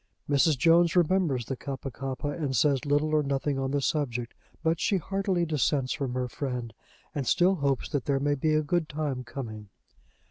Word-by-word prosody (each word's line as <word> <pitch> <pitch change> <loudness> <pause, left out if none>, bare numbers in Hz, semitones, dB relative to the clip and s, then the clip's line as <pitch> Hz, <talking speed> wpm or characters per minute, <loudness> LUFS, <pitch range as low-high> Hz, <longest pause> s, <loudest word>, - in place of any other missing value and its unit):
Mrs. 145 +1 +3
Jones 165 +5 +4
remembers 170 -8 +2
the 135 - -3
Kappa 135 +1 -6
kappa 135 +3 -4
and 145 -3 -2
says 140 +2 +2
little 145 +2 +2
or 155 - +4
nothing 140 0 -1
on 135 0 -1
the 140 +1 0
subject, 125 -5 -1 0.3
but 165 0 +1
she 200 - +2
heartily 190 0 0
dissents 145 -4 +1
from 130 -3 -3
her 125 0 -1
friend, 125 -4 -4 0.4
and 140 -4 -3
still 180 +2 +4
hopes 140 -4 0
that 145 -4 -2
there 140 -1 +1
may 145 +1 +1
be 155 +2 +1
a 155 - +2
good 160 +1 0
time 145 -4 -3
coming. 110 -5 -7
145 Hz, 185 wpm, -28 LUFS, 130-155 Hz, 0.4 s, Jones